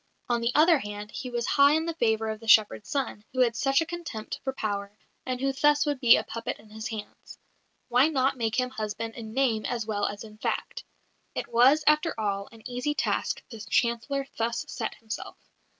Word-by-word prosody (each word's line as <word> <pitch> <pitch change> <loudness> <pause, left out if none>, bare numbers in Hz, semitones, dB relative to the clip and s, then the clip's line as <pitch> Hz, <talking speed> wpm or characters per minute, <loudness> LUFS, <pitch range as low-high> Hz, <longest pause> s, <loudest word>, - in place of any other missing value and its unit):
On 240 -1 +1
the 235 +1 +1
other 320 0 +6
hand, 205 -1 -7
he 255 - -5
was 240 -1 -2
high 280 +1 +5
in 320 +1 +1
the 335 - -2
favour 220 -6 +1
of 215 - -6
the 225 - -12
shepherd's 210 -3 +4
son, 270 -7 -2
who 255 - +1
had 235 -2 +3
such 270 +4 +2
a - - 0
contempt 335 -10 -6
for 265 - -1
power, 205 -4 -4 0.3
and 255 -1 -2
who 270 +1 0
thus 295 +2 +3
would 290 -3 -1
be 240 -3 +7
a - - 0
puppet 230 0 -5
in 210 0 -18
his 220 +1 -5
hands. 220 -2 -8 0.5
Why 250 +3 +4
not 275 -3 +1
make 225 -1 -1
him 255 0 -1
husband 220 0 -4
in 220 -2 -8
name 240 -5 +2
as 235 -3 -2
well 205 -2 -1
as 205 +1 -6
in 215 -1 -13
fact? - - -3 0.5
It - - -3
was, 255 +6 +5
after 305 0 +3
all, 200 -2 -2
an 225 -1 -11
easy 250 +4 -2
task 275 - -1
the 225 - -8
Chancellor 235 +5 0
thus 235 +1 -1
set - - -4
himself. 225 0 -7
235 Hz, 210 wpm, -27 LUFS, 220-275 Hz, 0.5 s, be